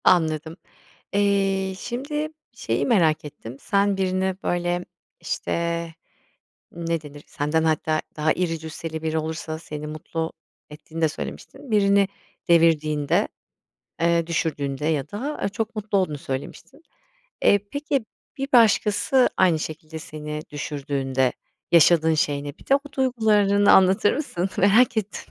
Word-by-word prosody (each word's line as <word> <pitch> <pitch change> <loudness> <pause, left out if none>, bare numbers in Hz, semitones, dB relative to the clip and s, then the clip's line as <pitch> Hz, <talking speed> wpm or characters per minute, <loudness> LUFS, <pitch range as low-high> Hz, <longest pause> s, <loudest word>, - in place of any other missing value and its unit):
Anladım. 160 -1 +2 0.6
Eee, 195 -1 +1
şimdi 285 +7 -3 0.3
şeyi 230 - -1
merak 160 -10 +3
ettim; 130 -4 -9
sen 200 +2 +1
birini 190 0 0
böyle, 175 0 -1 0.4
işte, - - -3 1.2
ne 165 -1 -2
denir? 145 0 -11
Senden 150 +2 0
hatta 155 0 +1
daha 155 0 +2
iri 170 -2 -1
cüsseli 160 0 -6
biri 160 0 0
olursa 160 0 -4
seni 150 -2 -7
mutlu 160 +1 -4 0.4
ettiğini 155 +2 -9
de 160 - +4
söylemiştin. 270 - -8
Birini 200 -2 +4 0.4
devirdiğinde, 155 -3 +3 0.7
eee, 170 0 +2
düşürdüğünde 150 -4 -2
ya 150 -3 0
da, 205 - -6 0.2
aaa, - - -1
çok 220 +3 -4
mutlu 210 -1 -1
olduğunu 180 -6 0
söylemiştin. 135 - -7 0.6
Eee, 205 - +5
peki 285 -4 -1 0.3
bir 275 0 -2
başkası 230 +2 +4
aynı 175 -4 +4
şekilde 155 +1 -6
seni 150 -1 -6
düşürdüğünde 135 -3 -1 0.4
yaşadığın 160 -1 +5
şey 145 -2 0
ne? 145 +1 -7
Bir - - -18
de 275 - +5
bu 290 - -12
duygularını 215 -6 +3
anlatır 190 +2 +5
mısın? 195 - -2
Merak 220 +5 +4
ettim. 210 -2 -3
170 Hz, 130 wpm, -24 LUFS, 155-200 Hz, 1.2 s, Eee